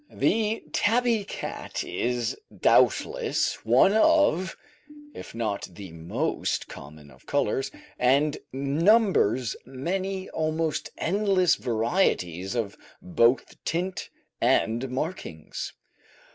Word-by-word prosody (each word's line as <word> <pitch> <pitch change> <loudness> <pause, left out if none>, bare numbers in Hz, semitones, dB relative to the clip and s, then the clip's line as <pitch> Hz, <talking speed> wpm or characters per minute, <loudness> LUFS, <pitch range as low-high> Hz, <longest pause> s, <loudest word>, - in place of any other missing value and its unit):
The 220 0 +1
tabby 230 0 +2
cat - - -5
is 120 -1 -2 0.2
doubtless 485 -3 +2
one 195 - +5
of, 220 - +3 0.6
if - - -10
not 110 -3 -2
the 95 0 -10
most 80 +1 -2
common 75 0 -12
of 65 - -21
colours, 140 -1 0 0.3
and 140 +4 +3 0.2
numbers 140 - +2
many 190 +7 -3
almost 160 0 -1
endless 190 -1 +2
varieties 110 - 0
of 110 -4 -2 0.2
both 135 -9 +1
tint 180 +3 -2 0.3
and 120 +4 +2
markings. 130 - -5
150 Hz, 90 wpm, -26 LUFS, 115-195 Hz, 0.6 s, one